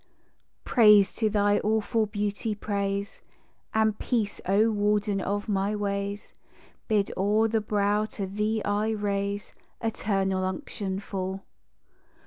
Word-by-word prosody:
Praise 210 -4 +6
to 220 -2 0
thine 205 0 +2
awful 220 +1 +1
beauty, 205 +1 -2
praise 200 0 -3 0.5
And 220 -1 +1
peace, 220 -5 -1
O 210 +4 +4
warden 205 -1 +1
of 205 +1 -2
my 200 0 0
ways! 200 0 -3 0.5
Bid 205 -2 +1
o'er 210 +3 +2
the 225 0 0
brow 205 0 +1
to 210 -2 -5
thee 210 +3 -1
I 205 +2 +1
raise, 200 -1 -2 0.3
Eternal 195 -4 0
unction 190 -1 -3
fall. 190 -1 -4
205 Hz, 115 wpm, -27 LUFS, 200-215 Hz, 0.5 s, Praise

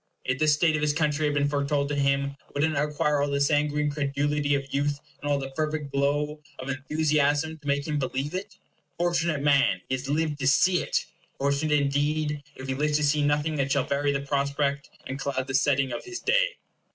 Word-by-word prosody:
If 130 +1 -1
this 155 -1 +4
state 160 0 +2
of 155 - -1
his 150 -1 +2
country 150 0 +1
had 145 -1 0
been 145 0 +2
foretold 140 0 0
to 145 - -1
him, 140 0 +1 0.2
would 145 - +1
it 160 - +3
not 150 -1 0
require 150 -1 +1
all 145 - +1
the 140 0 0
sanguine 150 +1 +1
credulity 145 0 0
of 140 0 -4
youth, 145 0 0 0.2
and 145 - -3
all 145 - +3
the 135 -1 -5
fervid 155 -2 -2
glow 145 +2 0 0.2
of 130 - -7
enthusiasm, 150 +2 +1
to 145 - -12
make 140 +1 0
him 150 -1 0
believe 135 +3 -2
it? 195 +1 -5 0.4
Fortunate 170 -4 0
man, 140 -1 +3
he - - -2
has 130 +1 -3
lived 150 0 0
to 135 - 0
see 180 +6 +4
it! - - -1 0.3
Fortunate, 140 +2 +1
indeed, 145 +1 0
if 130 - -8
he 135 - -1
lives 150 +2 +1
to 150 - -1
see 145 +1 +2
nothing 150 +2 +1
that 140 -1 0
shall - - +2
vary 145 +1 0
the 140 -1 -1
prospect, 140 0 -1 0.2
and 135 +1 -5
cloud 135 -2 -2
the 135 - -5
setting 135 -1 +2
of - - -4
his 370 0 -6
day! - - +2
145 Hz, 215 wpm, -26 LUFS, 140-150 Hz, 0.4 s, this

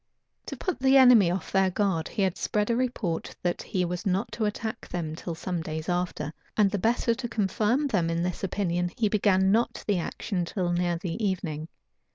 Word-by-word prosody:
To - - -5
put 370 - -2
the 265 +1 +5
enemy 245 -8 +7
off 185 +2 -3
their 190 -1 +3
guard, 185 -4 0
he 200 - -1
had 190 -1 +1
spread 210 +2 0
a - - +2
report 230 -9 -2
that 175 -1 0
he 185 -1 -1
was 180 0 -3
not 195 +3 0
to 215 +1 -1
attack 220 +1 -4
them 160 -3 -3
till 170 0 -5
some 175 +1 -3
days 155 0 -5
after; 175 -4 -2 0.2
and 205 -3 +4
the 205 - -1
better 235 +3 +2
to 240 0 -5
confirm 220 +5 +1
them 185 -11 +1
in 165 +1 0
this 180 +1 -3
opinion, 175 -2 0
he 220 -3 +2
began 190 -2 +3
not 230 +3 +1
the 200 -4 +1
action 180 +2 -3
till 175 0 -2
near 175 0 +1
the 175 +5 -4
evening. 170 -6 -2
190 Hz, 205 wpm, -27 LUFS, 175-215 Hz, 0.2 s, enemy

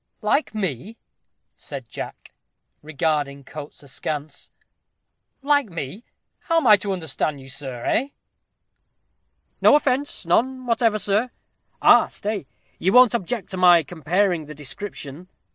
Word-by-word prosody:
"Like 280 -6 +1
me," 195 - -4 0.6
said - - -9
Jack, - - -8 0.5
regarding 145 -2 -2
Coates 150 +1 -10
askance; 145 +1 -5 0.9
"like 285 -4 +2
me 165 - -6 0.4
how 330 - +2
am 325 - +2
I 215 -3 +9
to 200 -1 -3
understand 155 -4 -2
you, 135 - -13
sir, 130 -3 -5
eh?" 265 - +1 1.5
"No - - +7
offence; 280 -6 0
none 255 +9 +1
whatever, 230 -2 +2
sir. 210 +4 0 0.5
Ah! - - +7
stay, 205 -8 -4 0.3
you 190 - +2
won't 250 +1 +7
object 225 -2 -3
to 190 - -4
my 175 -2 +6
comparing 175 +2 0
the 150 - -9
description. 150 +1 -7
185 Hz, 125 wpm, -23 LUFS, 150-230 Hz, 1.5 s, I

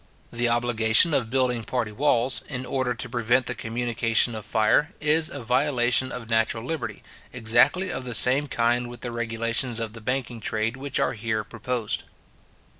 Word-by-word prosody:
The 120 0 0
obligation 120 +4 +4
of 120 -6 0
building 125 -2 0
party 120 -2 -3
walls, 125 +1 +1
in 130 -3 -5
order 130 -2 -2
to 120 - -6
prevent 120 +1 0
the - - -3
communication 115 0 0
of 110 -1 -7
fire, 110 - +1
is 155 +1 +3
a 140 -3 -7
violation 125 0 +1
of 120 -2 -7
natural 115 0 0
liberty, 160 +4 -5 0.3
exactly 125 +11 +2
of 130 - -4
the 125 -2 -1
same 135 +6 +7
kind 120 -1 0
with 120 -1 -11
the 120 - -5
regulations 115 +1 -1
of 115 -1 -4
the 115 - -10
banking 125 0 -3
trade 110 +2 -2
which 135 0 -4
are - - 0
here 110 -1 -3
proposed. 120 -3 -4
120 Hz, 170 wpm, -24 LUFS, 115-130 Hz, 0.3 s, same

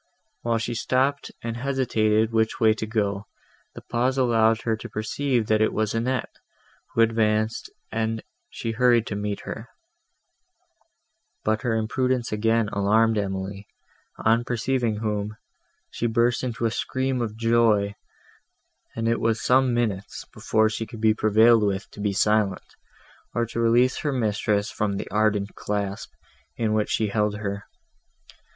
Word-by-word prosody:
While 115 -1 0
she 115 +2 -3
stopped 130 +4 0
and 115 0 -3
hesitated 115 -4 +1
which 110 0 +1
way 110 -1 +5
to 110 0 -5
go, 100 -2 -1 0.5
the - - -9
pause 125 +3 0
allowed 115 -3 +3
her 115 -1 +1
to - - -9
perceive, 120 +2 -1
that 110 0 +2
it 110 - +3
was 110 -1 -1
Annette, 125 +2 -2 0.6
who 115 - +4
advanced, 110 -1 +1 0.2
and 110 0 -2 0.3
she 115 - -4
hurried 120 -1 +3
to 100 - -4
meet 105 0 -3
her: 110 +2 -7 1.7
but 110 0 +1
her 120 -3 0
imprudence 125 +2 0
again 110 +1 +1
alarmed 110 +3 +2
Emily, 100 0 -3 0.5
on 115 +2 +2
perceiving 120 -1 0
whom, 105 0 -3 0.5
she 120 - -1
burst 120 +2 +1
into 120 -2 -2
a 115 - +1
scream 130 +2 -1
of 110 -2 -4
joy, 115 -3 +3 1.0
and 115 0 -1
it 115 0 +1
was 115 0 +1
some 130 0 +3
minutes, 110 -5 -2
before 110 0 +2
she 110 +1 -3
could 110 +1 -10
be 110 0 +4
prevailed 110 +2 +5
with 100 -2 -1
to - - -13
be 105 -1 +1
silent, 105 -1 +1 0.6
or 120 - +1
to 115 +1 -5
release 120 +2 +3
her 150 - -1
mistress 105 -4 0
from 100 -2 -1
the - - -5
ardent 105 -1 +1
clasp, 100 -1 -3 0.5
in 110 -2 0
which 110 -1 +1
she 110 -2 0
held 105 0 0
her. 100 -1 -4
110 Hz, 150 wpm, -24 LUFS, 105-120 Hz, 1.7 s, way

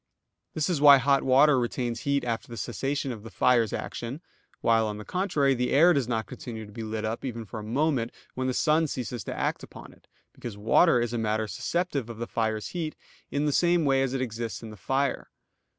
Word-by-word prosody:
_ - - -52
This 155 -1 0
is 170 -6 0
why 145 -1 +9
hot 135 +1 +3
water 135 +1 +5
retains 120 -1 -2
heat 140 +2 0
after 115 -2 -3
the 115 - -8
cessation 135 +4 -2
of 115 -3 -7
the 115 - -10
fire's 115 +3 +2
action; 120 +5 -5 0.4
while, 115 -1 +3
on 105 -1 -4
the 105 - -9
contrary, 175 -8 +1
the 125 -1 -1
air 170 +5 +6
does 140 -6 0
not 115 -2 -1
continue 110 -3 -8
to 105 - -13
be 115 +2 -7
lit 110 0 -3
up, 110 +1 -3
even 115 -4 -5
for 110 +2 -7
a - - -7
moment, 125 +1 0 0.2
when 130 0 -2
the 130 - 0
sun 160 +1 +3
ceases 125 -5 -4
to - - -5
act - - -1
upon - - -12
it, - - -25 0.3
because 115 -4 -8
water 120 +7 +4
is 120 0 -1
a 120 - -1
matter 110 0 0
susceptive 140 - -2
of 115 - -7
the 120 - -3
fire's 110 -2 -2
heat 165 -3 -4 0.3
in 145 +1 -1
the 150 - +2
same 175 0 +3
way 135 -1 +3
as 135 0 -1
it 130 - -1
exists 115 -3 -5
in 110 - -8
the - - -10
fire. 135 +6 -1
125 Hz, 230 wpm, -27 LUFS, 115-140 Hz, 0.4 s, why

